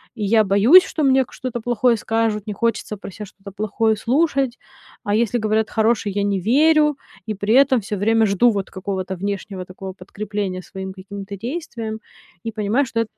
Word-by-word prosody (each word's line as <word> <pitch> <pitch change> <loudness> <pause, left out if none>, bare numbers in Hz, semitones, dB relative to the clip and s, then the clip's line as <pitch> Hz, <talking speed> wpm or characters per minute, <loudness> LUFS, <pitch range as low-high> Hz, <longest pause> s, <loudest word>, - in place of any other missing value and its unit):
я 215 0 +3
боюсь, 210 - +6
что 310 - -3
мне 265 -1 +4
к - - -20
что-то 245 -2 -5
плохое 240 0 +2
скажут, 220 -1 -1
не 210 - -3
хочется 225 0 -2
про 195 - -9
ся 210 +3 -8
что-то 200 +1 -13
плохое 215 +2 0
слушать. 270 +2 0 0.5
А 205 - 0
если 235 +1 +1
говорят 220 0 0
хорошее- 220 -2 +1
я 205 - +1
не 200 -1 0
верю, 300 - +3 0.3
и 215 - -1
при 205 +3 0
этом 265 -3 +5
всё 210 +1 -4
время 225 +3 +3
жду, 205 +4 +3
вот, 200 -3 -3
какого-то 190 0 -4
внешнего 195 0 -4
такого 190 +1 -8
подкрепления 195 0 -5
своим 190 0 -7
каким-то 200 +1 -8
действиям, 230 - -5 0.5
и 225 - -2
понимаю, 220 +6 0
что 230 -1 -3
это 225 - -4
215 Hz, 180 wpm, -21 LUFS, 200-235 Hz, 0.5 s, боюсь